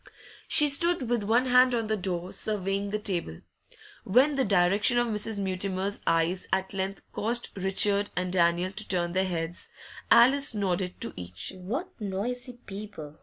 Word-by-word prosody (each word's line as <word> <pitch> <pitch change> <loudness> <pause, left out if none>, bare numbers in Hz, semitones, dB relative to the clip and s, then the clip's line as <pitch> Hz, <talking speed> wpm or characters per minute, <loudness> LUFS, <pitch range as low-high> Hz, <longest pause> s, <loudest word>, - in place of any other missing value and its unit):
She 300 - +8
stood 315 -1 +3
with 240 -2 +1
one 230 +5 +2
hand 250 0 +4
on 230 -1 -1
the 215 0 -1
door, 180 -2 -4
surveying 200 -1 -2
the 210 - -2
table. 180 - -4 0.6
When 255 +9 +3
the 275 -1 +1
direction 200 +4 +2
of 240 - +3
Mrs. 220 -1 -1
Mutimer's 190 0 -2
eyes 165 +3 +1
at 190 0 -1
length 195 0 -4
caused 235 +3 -1
Richard 200 +1 +2
and 180 0 -2
Daniel 175 +1 +2
to 215 +2 -7
turn 175 -2 -1
their 190 +2 0
heads, 170 -1 -4 0.4
Alice 265 +1 +5
nodded 185 -2 -2
to - - -2
each. 90 - -6
'What 235 - -5
noisy 240 +6 -4
people! 195 -7 -9
200 Hz, 160 wpm, -27 LUFS, 185-230 Hz, 0.6 s, She